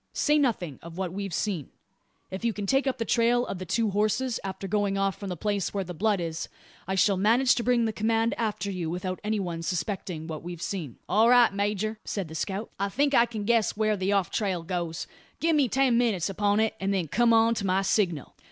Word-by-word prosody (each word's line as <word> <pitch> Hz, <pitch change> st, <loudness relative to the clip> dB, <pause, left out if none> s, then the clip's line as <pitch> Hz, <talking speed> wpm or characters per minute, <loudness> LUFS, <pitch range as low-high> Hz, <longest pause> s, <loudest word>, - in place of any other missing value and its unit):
Say 300 Hz, 0 st, +2 dB
nothing 200 Hz, -, -1 dB
of 170 Hz, +1 st, -10 dB
what 185 Hz, -2 st, -3 dB
we've 200 Hz, 0 st, -4 dB
seen. 170 Hz, -, -2 dB, 0.6 s
If 190 Hz, +4 st, -6 dB
you 230 Hz, -1 st, +1 dB
can 205 Hz, -1 st, -4 dB
take 270 Hz, +6 st, +2 dB
up 260 Hz, -, 0 dB
the 230 Hz, -, -2 dB
trail 240 Hz, +1 st, +2 dB
of 185 Hz, -, -5 dB
the 185 Hz, -, -6 dB
two 225 Hz, +3 st, +1 dB
horses 215 Hz, +5 st, 0 dB
after 195 Hz, 0 st, -5 dB
going 200 Hz, 0 st, 0 dB
off 195 Hz, -1 st, +1 dB
from 200 Hz, -, -5 dB
the 180 Hz, -, -4 dB
place 205 Hz, +1 st, -2 dB
where 195 Hz, -, 0 dB
the 180 Hz, -1 st, -7 dB
blood 205 Hz, +3 st, +1 dB
is, 165 Hz, -1 st, -4 dB, 0.4 s
I 190 Hz, -, -1 dB
shall 195 Hz, +1 st, +3 dB
manage 235 Hz, +6 st, +4 dB
to 240 Hz, -, -1 dB
bring 240 Hz, -1 st, +2 dB
the 220 Hz, -, -1 dB
command 225 Hz, +2 st, +1 dB
after 205 Hz, -3 st, -2 dB
you 175 Hz, -4 st, -3 dB
without 180 Hz, +2 st, -3 dB
any 215 Hz, 0 st, 0 dB
one 170 Hz, -3 st, -3 dB
suspecting 180 Hz, -1 st, -3 dB
what 160 Hz, -2 st, -6 dB
we've 175 Hz, 0 st, -7 dB
seen." 170 Hz, -8 st, -4 dB
"All 220 Hz, +5 st, +4 dB
right, 245 Hz, -3 st, +6 dB
major," 210 Hz, +2 st, -1 dB
said 195 Hz, -6 st, -4 dB
the -, -, -9 dB
scout, 195 Hz, +7 st, -3 dB
"I 200 Hz, 0 st, 0 dB
think 285 Hz, +6 st, +1 dB
I 235 Hz, -2 st, +5 dB
can 220 Hz, -3 st, -5 dB
guess 225 Hz, -1 st, +2 dB
where 215 Hz, -1 st, +2 dB
the 190 Hz, 0 st, -1 dB
off 195 Hz, -3 st, +1 dB
trail 190 Hz, -5 st, -1 dB
goes. 170 Hz, -2 st, -3 dB, 0.3 s
Give 325 Hz, -1 st, +2 dB
me 280 Hz, -5 st, +3 dB
ten 260 Hz, -2 st, +3 dB
minutes 205 Hz, -7 st, +1 dB
upon 205 Hz, +2 st, +1 dB
it, 220 Hz, 0 st, +2 dB
and 195 Hz, +1 st, -1 dB
then 185 Hz, -4 st, 0 dB
come 235 Hz, +9 st, +3 dB
on 225 Hz, 0 st, +5 dB
to 210 Hz, -3 st, -3 dB
my 190 Hz, +1 st, +2 dB
signal." 175 Hz, -, 0 dB
200 Hz, 235 wpm, -27 LUFS, 185-230 Hz, 0.6 s, right